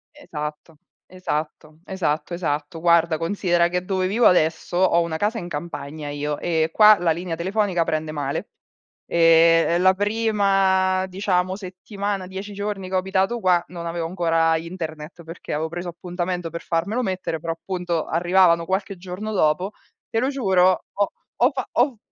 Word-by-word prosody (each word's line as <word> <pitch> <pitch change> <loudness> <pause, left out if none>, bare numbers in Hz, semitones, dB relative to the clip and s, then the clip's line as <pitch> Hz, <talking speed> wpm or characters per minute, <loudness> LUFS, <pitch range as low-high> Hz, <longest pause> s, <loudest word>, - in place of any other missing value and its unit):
Esatto, 155 - -7 0.3
esatto, 155 -3 -5
esatto, 170 -4 -2
esatto. 155 -2 -3
Guarda, 170 -1 +3
considera 175 0 +1
che 180 +1 -2
dove 185 0 -1
vivo 225 +5 +4
adesso 170 0 +1
ho 180 -2 +4
una 170 -1 -2
casa 215 +6 -1
in 175 - -7
campagna 150 -2 -6
io, 145 0 -3
e 160 -2 0
qua 215 -1 +7
la 175 -1 +1
linea 170 +1 -3
telefonica 185 0 0
prende 155 -1 -2
male. 145 -2 -3 0.6
E 165 0 +5
e 170 - +2
la 185 +1 +5
prima, 195 -3 +2
diciamo, 185 -1 0
settimana, 195 0 -5
10 195 +2 -7
giorni 200 -2 -4
che 190 - -2
ho - - +4
abitato 190 +5 0
qua, 180 -4 +3
non 170 -1 -7
avevo 170 0 -3
ancora 165 -2 +2
internet 165 -1 -7
perché 165 +1 -8
avevo 155 +2 -1
preso 175 +1 -5
appuntamento 175 0 -4
per 170 - -6
farmelo 200 +9 -1
mettere, 185 -6 -3
però 165 +1 -3
appunto 175 -1 -3
arrivavano 175 0 +3
qualche 190 +2 -2
giorno 185 +4 -6
dopo. 180 +2 +1 0.4
Te 225 - 0
lo 255 +3 +1
giuro, 190 -9 +2
ho 205 0 0 0.3
ho 250 +4 +4
fa 265 -3 -4
ho 245 0 +2
180 Hz, 160 wpm, -23 LUFS, 165-190 Hz, 0.6 s, qua